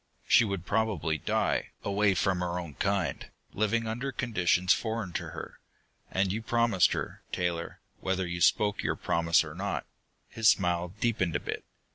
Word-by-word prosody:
She - - +6
would 100 -5 -3
probably 100 -8 0
die, - - 0
away 100 -1 +2
from 95 -1 +1
her 90 0 -2
own 85 -4 -5
kind, 100 +3 -1 0.2
living 110 +3 +1
under 120 +5 -3
conditions 90 -7 +2
foreign 110 -5 -3
to - - -3
her. - - -8 0.5
And 95 0 +1
you 110 - -2
promised 115 -6 +3
her, - - -4
Taylor, 85 -2 -2 0.2
whether 95 0 -1
you 85 0 -4
spoke 105 +2 +3
your - - 0
promise 85 0 +2
or 75 -1 -8
not." 100 +4 -3 0.4
His 115 -2 +3
smile 90 -2 +2
deepened 105 -8 0
a - - +2
bit. - - -5
95 Hz, 160 wpm, -29 LUFS, 90-110 Hz, 0.5 s, She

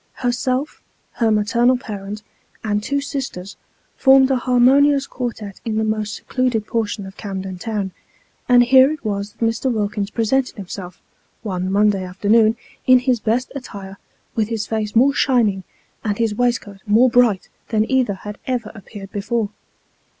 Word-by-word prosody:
Herself, 255 +3 -2 0.3
her 230 -2 0
maternal 235 +4 +3
parent, 205 -2 -7 0.4
and 210 -1 0
two 280 +6 -1
sisters, 270 - -5 0.4
formed 265 0 +5
an 265 - +3
harmonious 270 +3 +4
quartette 225 -7 -6
in 225 -2 -2
the 220 - +1
most 215 -1 -2
secluded 250 -4 -1
portion 215 -3 -2
of 190 +1 -11
Camden 190 -2 -6
Town; 205 -2 -3 0.6
and 245 -1 +7
here 260 +2 +6
it 310 -5 -7
was 200 -1 -3
that 230 - -2
Mr. 230 +3 0
Wilkins 205 -2 -2
presented 250 +4 0
himself, 185 -3 -8 0.4
one 185 -3 -2
Monday 200 -1 +2
afternoon, 215 +5 +2 0.3
in 255 0 +8
his 250 -1 +1
best 235 +4 -1
attire, 200 -8 -8 0.3
with 220 -2 0
his 220 -2 -2
face 215 0 -3
more 265 +5 +5
shining 225 -9 +2 0.4
and 205 -2 -1
his 225 -2 0
waistcoat 230 -4 -1
more 225 +5 +5
bright 235 -6 +3 0.2
than 220 -1 +1
either 255 -6 +1
had 205 +2 -9
ever 245 -4 -2
appeared 200 -1 -11
before. 210 +1 -2
220 Hz, 150 wpm, -20 LUFS, 205-250 Hz, 0.6 s, in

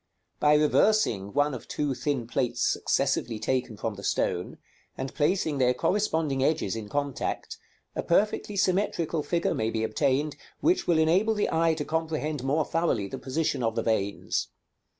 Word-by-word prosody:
By 150 0 +5
reversing 150 - +3
one 145 +3 +2
of - - -7
two 145 -2 -1
thin 130 0 -2
plates 120 0 -1
successively 115 -2 0
taken 120 0 -1
from 110 - -3
the 100 0 -10
stone, - - -1 0.4
and 135 - -4
placing 155 -2 +1
their 125 -1 +3
corresponding 160 -8 0
edges 140 -9 +1
in 110 -2 -6
contact, 145 0 -3 0.4
a - - -1
perfectly 205 +3 +1
symmetrical 185 -4 +1
figure 170 +3 0
may 110 0 -1
be 110 -1 -2
obtained, 140 +6 0 0.2
which 340 +5 +2
will 170 - +4
enable 185 +8 +3
the 210 - 0
eye 165 0 +3
to 150 -2 -3
comprehend 155 -3 -2
more 145 +3 +1
thoroughly 165 -12 0
the - - -6
position 140 0 -1
of 115 -1 0
the - - 0
veins. 100 -3 -1
145 Hz, 160 wpm, -27 LUFS, 120-165 Hz, 0.4 s, By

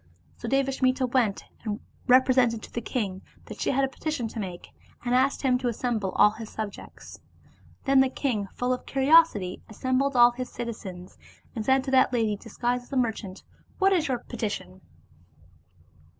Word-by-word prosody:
So 235 - -6
Devasmita 265 -1 +1
went 240 -5 0 0.2
and 215 -1 -3 0.3
represented 250 -3 +4
to - - -11
the 235 - -2
king 200 -5 -3 0.2
that - - -9
she - - 0
had 275 0 +2
a - - -2
petition 270 -2 -3
to 225 - -7
make, 180 -4 -6 0.4
and 245 - 0
asked 265 +3 +2
him 255 -2 +3
to 250 - -2
assemble 230 -4 -1
all 210 - +5
his 220 0 -9
subjects. 215 -2 -8 0.7
Then 270 -1 +5
the 265 0 +4
king 235 -7 -2
full 245 +5 -1
of 250 - -6
curiosity 270 - +4
assembled 260 +5 0
all 240 0 +7
the 255 - -3
citizens, 205 -8 -8 0.4
and 220 - -2
said 265 +2 +3
to 265 - -4
that 260 -1 +4
lady 220 -3 +1
disguised 245 +3 -3
as 275 - -13
a - - 0
mer 240 -3 +3
chant, 195 -3 -10 0.3
"What 390 0 +4
is 330 -4 +1
your 255 -2 0
petition?" 210 - -5
245 Hz, 175 wpm, -26 LUFS, 220-265 Hz, 0.7 s, all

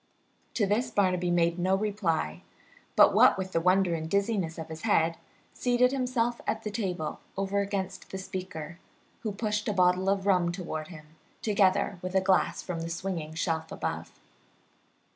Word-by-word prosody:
To 215 - +2
this 210 +5 +1
Barnaby 180 -3 +1
made 170 0 +2
no 185 +2 +2
reply, 185 - -1 0.5
but, - - +7
what - - +6
with 190 -1 -5
wonder 180 +1 +3
and 160 -1 -2
the - - -10
dizziness 200 -3 0
of 160 -1 -6
his 160 0 -7
head, 165 -6 +2 0.4
seated 250 0 +2
himself 250 -3 0
at 220 0 -1
the 210 - -3
table 185 -7 -3 0.2
over 195 +1 0
against 190 -2 -3
the 190 - -5
speaker, 180 -4 -6 0.4
who 220 - -3
pushed 210 0 -2
a 210 - +1
bottle 185 0 +3
of 195 -1 0
rum 180 -3 +3
toward 170 -4 -5
him, 155 -3 -11 0.4
together 195 -2 +2
with 185 +1 -5
a - - +6
glass 190 0 +2
from 175 -3 -4
the 165 - -4
swinging 165 -3 -4
shelf 160 -1 -2
above. - - -5
190 Hz, 165 wpm, -29 LUFS, 170-200 Hz, 0.5 s, but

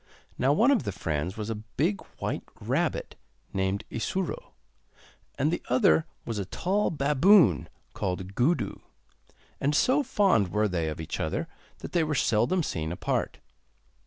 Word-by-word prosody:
Now 130 +3 +2
one 230 - +4
of 270 - +3
the 100 - -3
friends 85 0 -3
was 110 +1 -3
a 110 -1 -5
big 185 +7 +1 0.2
white - - -2 0.2
rabbit - - -1 0.4
named 95 +1 0
Isuro, 180 +10 -3 0.8
and 145 +3 +2
the - - -2
other 190 -9 +4 0.2
was 115 -3 -3
a 100 - -2
tall 195 - 0
baboon 150 - +4 0.2
called 95 +1 -3
Gudu, 125 - +1 0.8
and 145 +2 +1
so 260 - +4
fond 195 - +3
were 105 +4 +1
they 85 -4 -1
of 75 - -6
each 80 - -5
other - - -2 0.3
that - - -7
they 170 -2 +2
were 155 -1 -1
seldom 125 +9 +2
seen 80 - -3
apart. 90 - -2
125 Hz, 150 wpm, -28 LUFS, -, 0.8 s, one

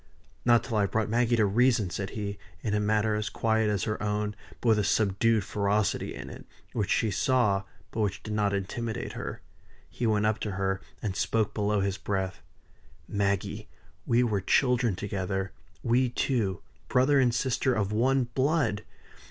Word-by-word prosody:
"Not 120 -1 +5
till 115 -4 -2
I - - +3
have 100 - 0
brought 110 -1 0
Maggie 120 +1 +3
to 110 -2 +3
reason," 110 -2 +3
said 95 +1 -3
he, 100 -1 -4 0.2
in 105 - -2
a 105 - +2
manner 105 +1 +2
as 105 -1 -1
quiet 110 +1 +1
as 100 -2 0
her 105 - -2
own, 105 0 -1 0.2
but 120 - +1
with 110 -1 +5
a - - +2
subdued 105 +2 +2
ferocity 100 +1 0
in - - -7
it, - - -11 0.3
which 105 -4 -1
she 110 - +2
saw, 105 -3 +2 0.3
but - - -5
which 105 -1 -1
did 110 - -4
not 105 -1 +1
intimidate 110 +4 -3
her. - - -6 0.5
He 120 - -2
went 105 -1 +2
up 110 0 +1
to 105 - -3
her, 95 0 -1 0.2
and 100 -3 -2
spoke 110 +1 0
below 105 -1 +1
his 100 0 -1
breath. 95 -5 -2 0.7
"Maggie, 100 -1 -1 0.4
we 120 +1 +4
were 105 -5 0
children 120 0 +2
together 95 0 -3 0.3
we 125 +1 +3
two 115 -7 -1 0.2
brother 135 +3 +4
and 125 -2 +4
sister 130 +1 +1
of 100 -2 0
one 130 +5 +3
blood! 135 -5 +1
105 Hz, 175 wpm, -28 LUFS, 100-120 Hz, 0.7 s, Not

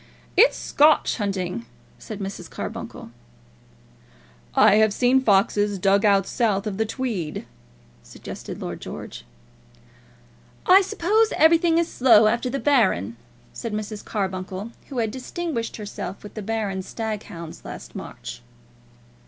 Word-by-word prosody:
"It's 450 +7 +6
Scotch 300 +2 +3
hunting," 195 0 -3 0.3
said 215 - -7
Mrs. 190 -3 -6
Carbuncle. - - -7 1.4
"I 205 - +6
have 220 -1 +4
seen 255 +1 +4
foxes 205 -2 +2
dug 195 +2 +3
out 200 -2 +4
south 210 -4 0
of 205 -3 -3
the 220 - +1
Tweed," 215 - -3 0.6
suggested - - -9
Lord - - -6
George. - - -8 1.4
"I 375 +2 +8
suppose 425 +3 +2
everything 330 +1 +5
is 335 -1 +2
slow 230 -7 +5
after 235 +4 +1
the 275 - -2
Baron," 215 - +2 0.4
said 230 -2 -5
Mrs. 210 0 -4
Carbuncle, 190 +1 -4 0.2
who 270 - -6
had 225 -2 0
distinguished 260 -1 -4
herself 200 -3 -6
with 210 - -10
the 215 - -6
Baron's 200 -3 -3
stag 220 -2 -3
hounds 165 -1 -9
last - - -9
March. - - -8
215 Hz, 130 wpm, -24 LUFS, 195-260 Hz, 1.4 s, I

